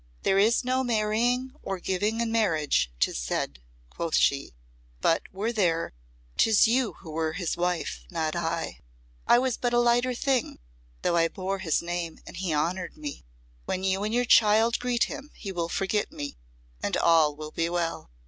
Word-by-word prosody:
"There 195 - +3
is 225 +5 +4
no 255 +1 +1
marrying 240 +3 +1
or 195 -1 -4
giving 205 +6 -1
in 230 -1 -1
marriage, 160 - +1
'tis - - +1
said," - - -2 0.3
quoth 165 -1 -2
she; 140 - +2 0.4
"but 165 - +2
were 210 +5 -2
there, 170 - +1 0.4
'tis 220 0 +5
you 245 0 +1
who 160 - -9
were 160 0 -1
his 175 -3 -2
wife 170 - -2
not 155 0 -2
I. 170 -1 -2 0.5
I 240 - +7
was 255 -1 +1
but 245 -1 -1
a - - +5
lighter 240 +1 +3
thing, 260 -1 0 0.5
though 170 - +2
I 165 0 +4
bore 190 +2 -4
his 170 -4 0
name 170 -1 -3
and - - -10
he 180 -1 -2
honoured 170 +5 -1
me. 145 - -7 0.4
When 185 - -2
you 190 +1 +1
and 210 - -1
your 245 +2 +2
child 225 +1 +5
greet 245 -1 +1
him 285 +2 -5
he 195 - -6
will 170 -2 -2
forget 200 +3 -1
me 145 -1 -6 0.5
and - - 0
all 160 -3 +4
will 155 0 -7
be 165 +1 -1
well." 170 - -2
190 Hz, 175 wpm, -27 LUFS, 165-230 Hz, 0.5 s, I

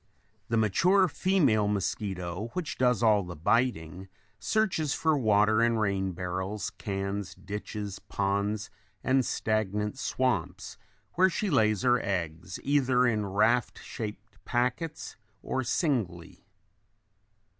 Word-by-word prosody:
The 115 - +1
mature 180 - +4
female 145 - +2
mosquito, 95 -1 -3
which 165 -5 -4
does 125 -3 +2
all 105 -2 +5
the 90 -2 -7
biting, 95 -1 0 0.3
searches 165 - 0
for 160 -1 +2
water 110 -3 +3
in 115 0 +3
rain 100 -3 0
barrels, 95 +3 -3
cans, 100 -1 -4
ditches, 105 0 -6
ponds, 100 +1 -2 0.3
and 130 0 +3
stagnant 105 +1 -1
swamps 100 -12 -2 0.3
where 185 +2 +4
she 195 +2 -2
lays 110 -7 +2
her 125 -1 +3
eggs 90 -1 -3
either 130 -3 +3
in 110 -4 +1
raft 110 +5 +2
shaped 105 0 -8
packets 125 +6 -2 0.3
or 130 - -1
singly. 115 - -2
110 Hz, 115 wpm, -28 LUFS, 100-125 Hz, 0.3 s, all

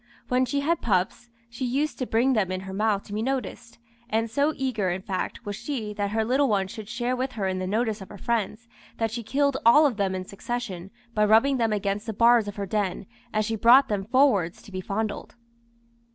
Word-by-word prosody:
When 255 +1 +3
she 280 +3 -1
had 330 +3 0
pups, 195 +3 0 0.2
she 235 +2 -7
used 275 +5 -1
to 255 - -2
bring 245 +4 +2
them 200 -6 +1
in 185 0 -3
her 190 0 -7
mouth 210 0 +1
to 205 - -10
be 215 - -1
noticed; 250 -2 -4 0.3
and 225 +1 0
so 285 +4 +2
eager, 245 -8 -1
in 180 +2 -3
fact, 195 +4 -4
was 205 0 -4
she 235 -3 -4
that 205 -1 -2
her 220 +1 0
little 265 +4 +2
ones 195 -4 0
should 215 -2 -8
share 240 +1 -1
with 255 +1 -3
her 200 -4 -2
in 185 0 -2
the 185 - -3
notice 220 +1 -1
of 190 - -10
her 205 - -10
friends, 230 +1 -2 0.3
that 225 -1 -1
she 235 +1 -4
killed 275 +4 +1
all 295 +7 +7
of 255 -7 +1
them 195 -2 0
in 185 0 -4
succession 200 -3 -5 0.2
by 210 - +2
rubbing 225 +6 +4
them 225 -2 +1
against 205 +1 -2
the 220 - -2
bars 230 0 +4
of 205 - -5
her 200 - -3
den, 200 -2 -2 0.3
as 215 0 0
she 225 0 -1
brought 240 +6 +6
them 205 -2 -1
forwards 220 -8 +2
to - - -14
be 185 0 -4
fondled." 215 +4 -4
220 Hz, 225 wpm, -26 LUFS, 200-245 Hz, 0.3 s, all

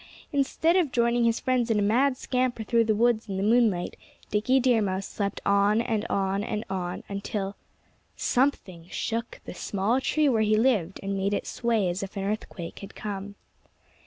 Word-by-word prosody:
Instead 285 +4 +2
of 335 -7 +2
joining 235 0 +2
his 230 0 +2
friends 250 -2 0
in 225 - +2
a - - +2
mad 255 +6 +3
scamper 250 -3 -1
through 230 +2 +3
the 220 -1 +1
woods 225 -1 +2
in 190 - -2
the 195 - -1
moonlight, 215 -5 +2 0.4
Dickie 235 +6 +3
Deer 245 -3 +3
Mouse 190 -1 -1
slept 200 -1 -3
on 200 +2 +3
and 225 -2 -1
on 195 0 0
and 215 0 -3
on, 180 -2 -3
until 200 0 -4 0.6
something 195 -10 0
shook 230 +5 -3
the - - -7
small 200 +7 0
tree 305 +2 +2
where 230 -5 +3
he 215 0 +3
lived 215 -7 +1
and 195 0 -2
made 195 +1 0
it - - -3
sway 230 -5 0
as 175 +2 -2
if 195 +1 -6
an 195 - -2
earthquake 195 -4 -4
had 200 - -10
come. 200 -1 -5
215 Hz, 185 wpm, -27 LUFS, 195-240 Hz, 0.6 s, mad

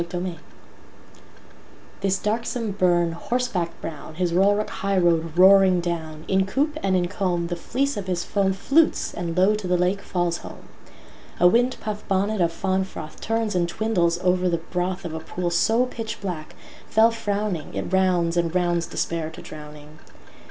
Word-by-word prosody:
Inversnaid 175 0 -4 1.6
THIS 195 0 +1
darksome 225 +2 -2
burn, 175 -3 +2
horseback 205 -1 -1
brown, 155 0 -7
His 175 0 0
rollrock 205 +3 +2
highroad 175 -4 +1
roaring 190 -1 +7
down, 160 -3 -4
In 190 0 +2
coop 290 +9 0
and 190 -1 +1
in 175 -1 +1
comb 180 -3 -1
the 175 - -2
fleece 270 +8 -1
of 195 -2 -5
his 180 -1 -1
foamFlutes 200 +11 +2
and 170 -1 -4
low 190 +3 +5
to 210 -3 -3
the 180 0 +2
lake 180 +3 +1
falls 175 -2 -1
home.A 175 - -4
windpuff 220 -1 +1
bonnet 200 +1 +1
of 170 -1 +2
fáwn 190 +2 0
fróthTurns 215 +6 -3
and 175 -1 +1
twindles 175 -5 +1
over 180 0 +2
the 170 - +1 0.2
brothOf 180 -2 -2
a - - -3
pool 175 +2 -3
so 225 +8 +3
pitchblack, 200 -9 -6 0.4
féll 225 +1 +5
frówning, 205 -7 -3
It - - -4
rounds 180 -3 +2
and 170 0 0
rounds 175 -1 +1
Despair 165 -2 -2
to 160 - -11
drowning. 150 0 -11
185 Hz, 150 wpm, -24 LUFS, 170-205 Hz, 1.6 s, roaring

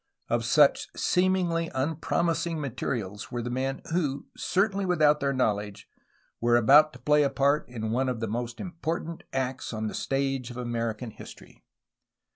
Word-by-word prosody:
Of 120 0 0
such 145 +3 +4
seemingly 180 -2 +1
unpromising 165 +3 0
materials 115 -7 -4
were 120 -1 -3
the 120 - -4
men 135 +2 -2
who, 145 -6 -1
certainly 200 +1 0
without 155 -5 +3
their 140 -1 0
knowledge, 105 -6 -1 0.5
were 120 0 +4
about 145 +6 +6
to - - -12
play 150 0 +3
a 140 - +3
part 140 +1 +1
in 110 -3 -4
one 130 +3 +1
of 125 -3 -3
the 115 - -2
most 120 +2 -4
important 170 -2 -4
acts 130 0 -2
on 110 -1 -3
the 105 - -3
stage 135 -2 -1
of 120 - -8
American 115 -1 -3
history. - - -13
135 Hz, 155 wpm, -27 LUFS, 120-155 Hz, 0.5 s, about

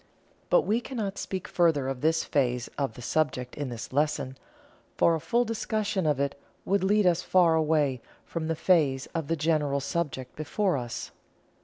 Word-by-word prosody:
But - - +5
we 225 +3 +1
cannot 215 -6 -4
speak 190 +1 -4
further 160 -7 +2
of 135 -2 -3
this 160 +1 +2
phase 125 -3 0
of 135 -6 -2
the 125 - -9
subject 130 -4 -1
in 145 -3 -3
this 120 +1 -7
lesson, 145 -2 0 0.6
for 170 - +4
a 165 - 0
full 240 +9 +1
discussion 215 -5 -1
of 145 -3 +1
it 140 0 -2 0.2
would 195 -1 +1
lead 205 +1 +3
us 175 -1 +3
far 180 -3 +4
away 150 -5 +2 0.2
from 165 -2 -4
the 165 - 0
phase 150 -6 +2
of 160 -4 -2
the 165 - +1
general 150 -3 +1
subject 140 -4 -3
before 185 +4 0
us. 120 -3 -5
160 Hz, 175 wpm, -28 LUFS, 140-185 Hz, 0.6 s, But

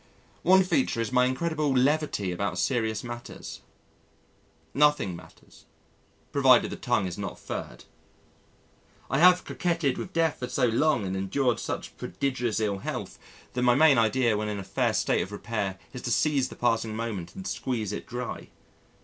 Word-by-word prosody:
One 190 +2 +6
feature 195 - 0
is 115 0 -1
my 125 0 +4
incredible 150 +3 0
levity 135 -7 +1
about 90 +1 -2
serious 110 +2 0
matters. 120 0 -8 1.1
Nothing 145 -10 +3
matters, - - -16 0.7
provided - - +5
the - - -4
tongue 95 - 0
is 90 +1 -5
not 100 - -5
furred. - - -7 1.3
I 135 - +2
have 180 +1 +6
coquetted 170 -6 -1
with 180 - -6
death 165 -3 +1
for 125 - -4
so 130 - +1
long 120 +2 +2
now, 95 - -3
and 95 - -2
endured 120 +6 0
such - - -5
prodigious 125 -5 -2
ill 100 -3 -1
health - - -5 0.3
that 125 - -2
my 120 -1 +4
main 145 -3 +6
idea 115 0 +2
when 105 0 -2
in 105 - -3
a 100 - -5
fair - - 0
state - - +1
of 95 - -5
repair 105 -2 -3 0.2
is 125 - -6
to 120 - -3
seize 145 0 +2
the - - -10
passing 115 -2 0
moment 110 -6 -4
and 190 - -8
squeeze 115 - -2
it - - -6
dry. 125 0 -5
120 Hz, 165 wpm, -27 LUFS, 105-145 Hz, 1.3 s, One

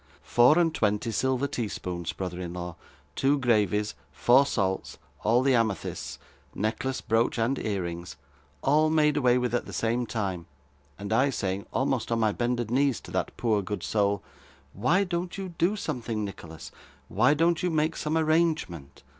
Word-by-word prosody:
Four 125 +6 +5
and 165 -2 +3
twenty 105 -3 0
silver 130 +4 0
tea 120 -5 -2
spoons, 90 -4 -4
brother 90 -1 -5
in 85 -1 -5
law, 90 -1 -6 0.4
two 140 +2 +2
gravies, 105 -5 +1 0.2
four 130 +3 +4
salts, 95 -7 -1 0.3
all 120 +4 +3
the 135 0 +3
amethysts 115 -5 -1 0.4
necklace, 115 +6 -2
brooch, 115 +2 +1
and 120 +4 0
ear 100 -4 -2
rings 85 +1 -6 0.5
all 155 +3 +4
made 150 -2 +3
away 125 -4 +3
with, 125 -2 -1
at 120 - -1
the - - -7
same 120 +2 0
time, 95 -6 -3 0.5
and 100 +2 -4
I 130 +5 +4
saying, 100 -6 -3
almost 130 -3 0
on 115 - +1
my 110 -1 +3
bended 120 0 -1
knees, 135 0 +2
to - - -12
that - - -2
poor 110 -4 +1
good 105 +2 -5
soul, 100 -2 +1 0.5
"Why 160 - +2
don't 175 0 -3
you 190 -1 -4
do 175 +4 0
something, 115 - -3
Nicholas? 80 -5 -9 0.4
Why 125 +9 +3
don't 165 +2 +2
you 180 - +1
make 155 0 +1
some 155 +1 -1
arrangement?" 155 - 0
120 Hz, 170 wpm, -27 LUFS, 100-140 Hz, 0.5 s, Four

